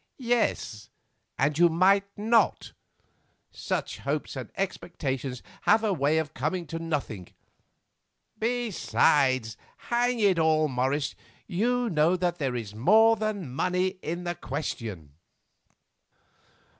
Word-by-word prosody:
"Yes, 235 - -1 0.5
and 145 +3 +1
you 175 0 +6
might 195 +4 +3
not; 225 +2 +2 0.8
such - - -3
hopes - - -3
and - - -7
expectations 135 -9 -3 0.3
have 220 +2 +5
a 210 -3 +1
way 150 -1 +1
of 160 -3 -2
coming 160 +7 -2
to 165 +1 -5
nothing. 140 - -4 1.1
Besides, 145 - +1 0.3
hang 245 0 +2
it 195 -5 +3
all, 155 -1 +3
Morris, 135 +2 -1 0.3
you 245 +6 0
know 165 -2 +3
that 175 -1 -1
there 135 -4 -1
is 110 -4 -5
more 220 - +5
than 205 - -3
money 185 +5 0
in 170 +3 -4
the 175 0 -2
question." 115 - -5
170 Hz, 115 wpm, -27 LUFS, 135-205 Hz, 1.1 s, you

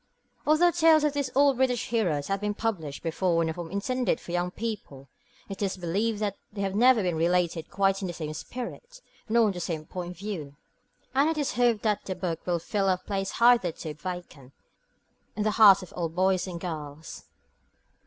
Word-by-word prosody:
Although 325 +3 +5
tales 320 -2 +5
of 300 -1 +2
these 285 -2 -1
old 280 -1 +4
British 250 -2 +1
heroes 175 -12 0
have 195 0 -1
been 210 0 -1
published 175 -11 -3
before 165 0 +1
in 160 - -1
a - - -2
form 170 0 -7
intended 250 +6 -1
for - - -10
young 175 0 0
people, 185 -11 -6 0.4
it 195 0 -7
is 195 -2 -1
believed 200 +5 -1
that 205 -2 -1
they 205 -1 -5
have 195 -1 -1
never 235 +1 +5
been 180 -2 0
related 170 0 0
quite 195 0 +1
in 190 - -2
the 175 - -4
same 155 -2 -5
spirit 255 - -7 0.3
nor 230 +1 +4
from 210 - +2
the 180 - -6
same 165 -3 -4
point 180 +1 -6
of - - -22
view; 170 -8 -6 0.6
and 280 +4 +3
it 320 - -1
is 290 -3 0
hoped 235 -2 +2
that 210 -2 +1
the 185 - -3
book 175 -3 -4
will 175 -1 +2
fill 195 +3 -1
a 185 - +2
place 195 0 -3
hitherto 190 -10 +3
vacant 150 -5 -8 0.8
in 210 - -1
the 215 - +2
hearts 205 -3 +7
of 180 - -12
all 170 -2 -2
boys 185 +2 +1
and 175 -2 -5
girls. 155 -3 -7
195 Hz, 200 wpm, -27 LUFS, 170-230 Hz, 0.8 s, hearts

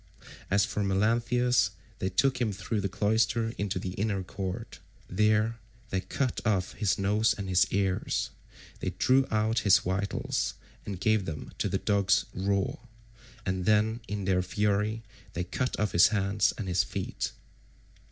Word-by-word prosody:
As 100 +1 +3
for 105 -1 -2
Melanthius, 115 +5 +2 0.3
they 95 - -1
took 130 +6 +1
him 115 -3 +1
through 100 +2 -3
the 100 - -1
cloister 110 +4 +1
into 100 -2 -1
the 90 0 -3
inner 100 0 -1
court. 95 +4 -5 0.3
There 110 +3 +2 0.3
they 95 - 0
cut 125 +8 -2
off 95 -5 0
his 105 0 0
nose 105 +3 +2
and 100 -2 -4
his 90 -1 +4
ears; 95 -1 0 0.5
they - - -2
drew 135 +1 +4
out 110 +1 +1
his 100 -3 +6
vitals 95 +2 -1 0.3
and 100 -3 -4
gave 110 0 +2
them 75 -4 -6
to - - 0
the - - 0
dogs 100 -2 +2
raw, 100 +1 0 0.7
and 95 -1 -1
then 110 +2 +3
in 100 -2 -3
their 95 -1 +2
fury 105 +3 0 0.3
they 90 - -2
cut 100 +8 -2
off 105 -3 +1
his 85 +3 +7
hands 100 -1 +1
and 100 - -4
his 90 +1 +2
feet. 95 -1 -4
100 Hz, 155 wpm, -29 LUFS, 95-110 Hz, 0.7 s, his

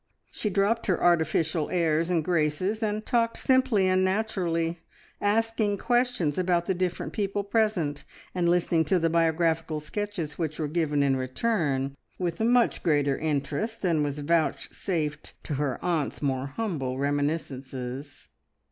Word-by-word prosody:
She 210 - -2
dropped 205 +4 +1
her 185 - +1
artificial 160 -2 +2
airs 165 -1 +1
and 165 -4 +1
graces, 180 +5 0
and 215 0 -1
talked 230 -2 +1
simply 260 -7 +3
and 185 0 +3
naturally, 180 -5 0 0.4
asking 215 0 +1
questions 240 - +1
about 175 -1 +1
the 190 - +1
different 180 -1 -2
people 200 -1 -1
present, 200 -9 0 0.3
and 175 -2 +1
listening 170 -1 +3
to 190 - +2
the 165 -1 +1
biographical 165 -1 +1
sketches 175 -1 -4
which 155 -2 -2
were 155 - -1
given 150 -2 +1
in 135 -1 +2
return, 135 - -1 0.2
with 175 -2 -2
much 235 +2 +3
greater 145 -4 +2
interest 155 - -2
than 165 -5 +2
was 145 -1 -1
vouchsafed 160 +1 -1
to - - -4
her 135 -4 -1
aunt's 165 -5 0
more 135 -2 -1
humble 140 - -3
reminiscences. 140 -2 -3
170 Hz, 140 wpm, -27 LUFS, 150-200 Hz, 0.4 s, simply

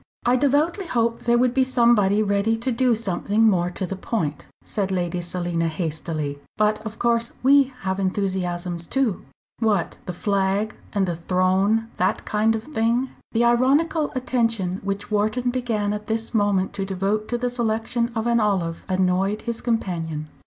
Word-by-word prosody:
"I 245 - +4
devoutly 295 +8 +1
hope 230 -4 0
there 240 0 +4
would 245 0 +2
be 265 0 +3
somebody 235 -5 +3
ready 200 +2 +1
to 245 +3 -2
do 245 0 +2
something 210 0 0
more 180 -5 +3
to 185 +1 -4
the 195 - -4
point," 165 -7 -3 0.2
said 200 -2 -2
Lady 180 -1 -1
Selina, 175 -1 -2
hastily. 155 -3 -3 0.2
"But 215 0 +2
of 220 0 -7
course 235 -1 +1
we 275 +1 +6 0.2
have 190 0 -2
enthusiasms 180 -3 -2
too." 260 -8 0 0.4
"What, 210 -7 0
the 180 - -3
Flag 200 +3 0 0.2
and 200 -2 +1
the 175 - -1
Throne 190 +6 +1
that 190 +4 0
kind 220 +1 +2
of 220 - -4
thing?" 245 -2 0 0.2
The 230 +1 +3
ironical 285 +6 +3
attention 230 -7 0
which 200 +2 -4
Wharton 215 +4 +1
began 225 -5 -1
at 210 0 -6
this 225 +1 -2
moment 205 -3 +1
to 200 -1 -3
devote 195 +3 -1
to 240 - -1
the 245 0 -1
selection 235 0 -1
of 225 0 -1
an 235 0 +3
olive 185 -6 0
annoyed 190 +2 +1
his 235 -1 -4
companion. 165 -9 -2
210 Hz, 165 wpm, -23 LUFS, 185-235 Hz, 0.4 s, we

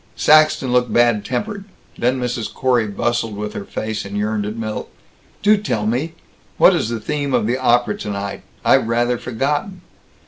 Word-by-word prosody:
Saxton 155 -4 +4
looked 125 -2 +2
bad 120 -2 +3
tempered. 200 - -3 0.3
Then 125 +2 0
Mrs. 125 -2 -3
Corey 125 -4 +1
bustled 115 +1 -2
with 105 0 -4
her - - -5
face 110 -1 -4
and 100 +1 -6
yearned 105 0 -1
at 105 - -5
Milt, 110 -1 -4 0.5
"Do 210 +1 +5
tell 115 - -2
me: 130 +9 -1 0.4
what - - +6
is 110 - -1
the 115 -1 -3
theme 145 +1 -2
of - - +1
the 120 +3 0
opera 120 -1 +2
tonight. 100 -1 -5 0.2
I've - - +4
rather 120 +1 +1
forgotten." 145 - -2
120 Hz, 170 wpm, -19 LUFS, 110-130 Hz, 0.5 s, what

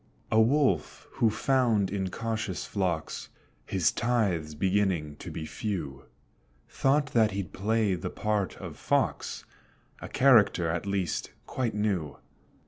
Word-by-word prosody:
A 110 - +5
Wolf 130 - +1
who 115 - +2
found 115 -4 +2
in 95 -2 -1
cautious 110 -2 -3
flocks 90 -6 -2 0.4
His 90 -5 +2
tithes 100 -10 0
beginning 95 -4 0
to - - -8
be 80 - -5
few, 80 -8 -4 0.6
Thought 140 0 +1
that 110 -2 +4
he'd 95 -4 -4
play 105 0 +1
the 90 - -3
part 105 -3 -1
of - - -8
Fox, - - -1 0.5
A - - -8
character 115 -10 +5
at 85 +4 -2
least 95 -5 -1 0.2
quite 120 -5 -2
new. 95 -9 -1
100 Hz, 130 wpm, -28 LUFS, 90-115 Hz, 0.6 s, A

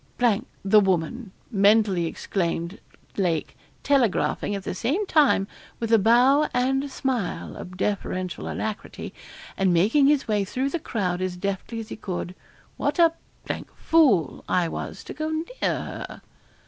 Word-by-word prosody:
' 200 - -12
the 210 +2 +6
woman,' 195 +3 0 0.2
mentally 200 -4 +4
exclaimed 170 +1 -2 0.4
Lake, 170 -6 0 0.3
telegraphing, 240 -6 +1
at 195 - -5
the - - -3
same 280 - -1
time, 290 - +3 0.3
with 230 -1 -1
a 225 - +7
bow 250 +8 +5
and 265 +2 +2
a 285 - -5
smile 255 -7 -3
of 180 0 -9
deferential 185 -2 -2
alacrity, 215 -1 -5 0.4
and 190 -1 +2
making 215 - +4
his 290 -3 +2
way 210 -2 +1
through 260 +8 -2
the 340 - -1
crowd 185 - -2
as 185 -1 -2
deftly 200 +4 -3
as 220 - -7
he - - -5
could; 180 -3 -5 0.4
what - - -1
a 335 -1 +5 0.6
fool 255 - +3
I 180 -2 +2
was - - -6
to - - -8
go 310 +2 -3
near 315 +1 -2 0.2
her.' - - -5
210 Hz, 145 wpm, -25 LUFS, 185-265 Hz, 0.6 s, a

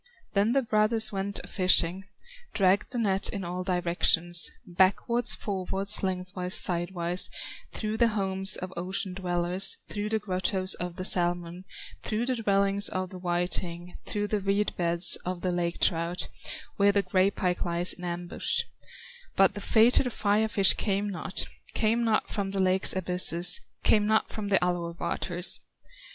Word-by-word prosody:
Then 210 +3 +1
the 275 0 +1
brothers 220 0 +2
went 200 0 -4
a - - -11
fishing, 185 0 +2 0.5
Dragged 195 +2 +2
the 250 - -4
net 200 -4 +2
in 200 -2 -5
all 180 +1 -5
directions, 175 -1 +2 0.2
Backwards, 215 +6 +1
forwards, 195 0 -1
lengthwise, 180 -1 -2
sidewise, 175 0 +4 0.4
Through 215 0 -4
the 235 0 +4
homes 195 -3 0
of 185 0 -7
ocean 185 +2 -2
dwellers, 180 +1 -2
Through 210 0 -4
the 220 - 0
grottoes 185 -1 -1
of 180 -1 -6
the 185 - -6
salmon, 175 0 -1 0.4
Through 220 +2 -2
the 255 0 -1
dwellings 200 -2 +2
of 185 0 -4
the 185 - -9
whiting, 175 0 -2
Through 205 -1 -3
the 210 - 0
reed 200 +1 -1
beds 170 0 +4
of 180 -1 -6
the 185 - -1
lake 175 -1 -2
trout, 170 +1 0 0.5
Where 200 0 +4
the 200 0 +1
gray 190 0 +2
pike 180 -3 -2
lies 175 0 0
in 180 - -13
ambush; 175 0 -2 0.7
But 195 0 +4
the 205 - -8
fated 240 +4 +3
Fire 210 0 +1
fish 200 -3 +4
came 200 0 -2
not, 180 0 -2 0.3
Came 230 +2 +1
not 220 -2 0
from 200 -2 -3
the 195 0 -3
lake's 190 0 +2
abysses, 180 - +1 0.2
Came 210 -1 +3
not 220 0 +1
from 215 -2 -6
the 200 -1 +3
Alue 170 -1 -3
waters. 180 0 -2
190 Hz, 155 wpm, -27 LUFS, 180-205 Hz, 0.7 s, sidewise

